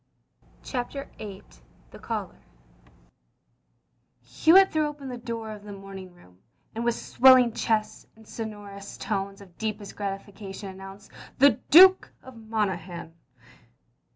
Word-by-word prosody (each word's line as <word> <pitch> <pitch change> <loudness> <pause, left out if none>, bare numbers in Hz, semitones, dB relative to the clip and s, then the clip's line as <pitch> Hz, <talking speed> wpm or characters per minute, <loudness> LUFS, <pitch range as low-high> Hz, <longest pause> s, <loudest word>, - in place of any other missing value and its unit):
CHAPTER 270 +2 -5
VIII 200 -3 -8 0.5
THE - - -12
CALLER - - -5 1.8
Hewitt 325 - +5
threw 310 -1 +1
open 290 -2 -8
the 250 - -6
door 230 -2 -6
of 210 -1 -10
the 205 -1 -9
moming 195 -2 -10
room, 90 - -21 0.3
and 230 - -4
with 235 -1 +1
swelling 255 -1 +5
chest 220 -2 -1
and 220 -1 -19
sonorous 205 -3 -8
tones 195 -1 -4
of 185 -3 -17
deepest 215 -2 -4
gratification 195 0 -6
announced, 195 +1 -12 0.3
"The 280 +2 +5
Duke 375 +4 +8
of 260 -1 -13
Monaghan." 190 -7 -4
210 Hz, 120 wpm, -26 LUFS, 195-240 Hz, 1.8 s, Duke